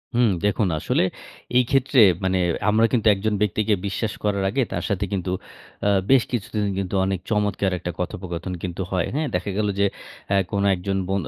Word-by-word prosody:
হুম, 120 -2 +4 0.2
দেখুন 105 0 +2
আসলে - - +1 0.5
এই 125 - +6
ক্ষেত্রে 135 0 +3 0.2
মানে 95 0 +1 0.3
আমরা 110 +2 +4
কিন্তু 115 -3 +2
একজন 105 +2 -1
ব্যক্তিকে 105 +1 +1
বিশ্বাস 100 +2 -2
করার 100 -2 0
আগে 135 +7 0
তার - - -2
সাথে 100 -1 0
কিন্তু 95 -2 -2 0.6
আ - - +4 0.2
বেশ 130 -3 +6
কিছুদিন 105 -3 -2 0.4
অনেক 95 -1 -1
চমৎকার 105 -2 +1
একটা 90 - -4
কথোপকথন 90 0 -4
কিন্তু 90 0 -4
হয় 90 -3 0
হ্যাঁ। 155 0 0
দেখা - - -2
গেল 105 -1 +1
যে 100 - +4 0.4
অ্যা 100 - +3
কোনো 100 -1 0
একজন 95 +2 -2
বো 95 - -1
100 Hz, 175 wpm, -23 LUFS, 95-110 Hz, 0.6 s, এই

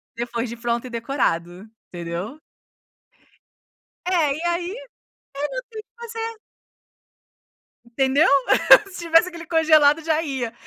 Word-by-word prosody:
Depois 235 0 -4
de 235 - -7
pronto 235 +1 -2
e - - -9
decorado, 220 -7 -2 0.2
entendeu? 175 - -6 1.7
É 330 -6 +2
e 310 - -7
aí, 345 +1 -1
é, - - -6
não - - -10 0.9
tem 430 - -18
o - - -69
que - - -77
fazer. 455 -1 -6 1.5
Entendeu? 265 +5 +2 0.6
Se 365 - -8
tivesse 330 +2 +4
aquele 340 -1 -10
congelado 315 -1 +4
já 315 0 +1
ia. 265 -7 -4
290 Hz, 125 wpm, -22 LUFS, 235-340 Hz, 1.7 s, tivesse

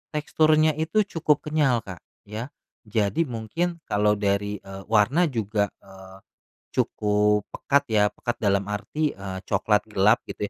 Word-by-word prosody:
teksturnya 155 +1 +3
itu 190 +7 +2
cukup 165 -6 0
kenyal, 145 -7 +1
Kak, 95 -5 -9 0.3
ya. 110 +4 -5 0.4
Jadi 105 +8 +1
mungkin, 160 +9 -3
kalau 105 0 +2
dari, 100 0 0
eee, 95 0 -9
warna 115 - +3
juga, 110 -4 0 0.2
eee, 95 -1 -14 0.6
cukup 105 0 +1
pekat 140 0 +1
ya, 105 -2 +4
pekat 120 -1 -4
dalam 100 -1 +2
arti, 150 +9 -2
eee, 95 -1 -6
coklat 105 +1 +1
gelap 105 0 +4
gitu 105 - -4
105 Hz, 135 wpm, -25 LUFS, 100-150 Hz, 0.6 s, ya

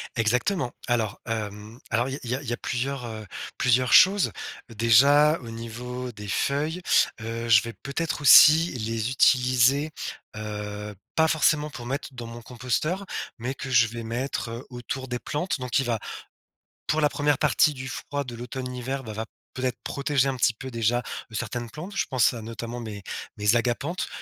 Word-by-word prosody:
Exactement. 125 - +1
Alors, 115 -4 0
hem, 110 0 -5
alors, 120 +2 +1
il 135 +2 -4
y 120 0 -1
a 135 - -5
il 135 - -6
y - - 0
a - - -2
plusieurs, 125 +1 -3
heu, 110 -2 -7 0.3
plusieurs 125 0 +3
choses. 195 +1 +6 0.4
Déjà, 140 +8 +5
au 115 - -9
niveau 125 +2 -6
des 105 -2 -9
feuilles, 150 - -1 0.4
heu, 115 +1 -4
je 115 -2 +7
vais 115 -1 -6
peut-être 150 +4 -2
aussi 160 +3 +8
les 115 -1 -2
utiliser, 130 +3 +4 0.4
heu, 105 -1 -5 0.2
pas 160 0 +4
forcément 150 -1 +2
pour 125 -5 -9
mettre 135 +4 -3
dans 120 -2 -7
mon 115 +1 -9
composteur, 130 - -2 0.3
mais 125 +3 -4
que 135 - -6
je 115 -2 +5
vais 115 +1 -6
mettre, 120 +2 -3
heu, 115 +3 -7
autour 130 +2 -5
des 125 -1 -3
plantes. 170 +4 -2
Donc 125 +1 0
il 135 - 0
va 115 -2 0 0.9
pour 155 - +1
la 150 - +4
1re 145 -1 +1
partie 150 - +3
du 130 0 -6
froid 145 +1 -4
de 120 -2 -7
l'automne-hiver, 125 +2 -5
bah, 110 - -6
va 110 +1 -4 0.3
peut-être 130 -1 -2
protéger 140 -1 +1
un 135 - -1
petit 120 -1 +2
peu, 130 +4 -8
déjà, 115 +1 +1 0.3
heu, - - -13
certaines 120 +2 -4
plantes. 175 - -8
Je - - +1
pense 130 -2 +3
à, 115 - -6
notamment, 115 +2 -6
mes 105 -3 -7 0.3
mes 105 +2 +3
agapanthes, 125 +9 -1
125 Hz, 180 wpm, -26 LUFS, 115-140 Hz, 0.9 s, aussi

